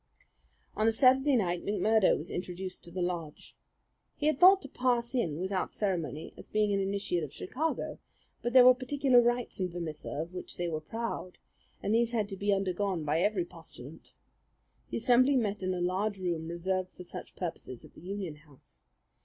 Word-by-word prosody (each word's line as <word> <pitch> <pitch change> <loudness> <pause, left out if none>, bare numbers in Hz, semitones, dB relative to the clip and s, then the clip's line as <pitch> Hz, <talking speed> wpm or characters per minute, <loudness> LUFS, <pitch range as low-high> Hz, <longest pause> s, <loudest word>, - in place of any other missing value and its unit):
On 215 +1 +2
a - - +5
Saturday 265 +4 +4
night 180 -6 0
McMurdo 210 0 +3
was 155 - -7
introduced 180 +1 -5
to 170 - -9
the 180 0 -2
lodge. 170 -4 -5 0.6
He 295 - -3
had 305 -3 +2
thought 375 +2 +8
to - - -7
pass 245 -2 0
in 170 - -1
without 190 +1 -2
ceremony 170 -6 -3
as - - -12
being 210 -1 +1
an 200 - +1
initiate 195 -3 -1
of 145 - -6
Chicago; 310 +11 -3 0.4
but 240 - -1
there 255 -1 +9
were 255 - +10
particular 255 -1 +3
rites 240 -1 0
in 185 -1 0
Vermissa 170 -3 -6
of 165 +4 -4
which 180 - -7
they 175 - -1
were 155 -2 -3
proud, 225 0 -5 0.5
and 205 - +1
these 235 +1 +2
had 215 -3 +1
to 195 - -4
be 205 +2 0
undergone 195 -2 0
by 150 +2 +1
every 195 -3 +1
postulant. 160 -4 -13 0.8
The - - -2
assembly 255 +4 +4
met 210 -5 0
in 185 0 -1
a - - -3
large 195 +4 0
room 170 -4 -2
reserved 185 +2 -2
for 180 - -9
such 175 - -9
purposes 165 -8 -6
at - - -17
the - - -15
Union 185 -4 -5
House. 150 -3 -21
195 Hz, 185 wpm, -30 LUFS, 175-235 Hz, 0.8 s, were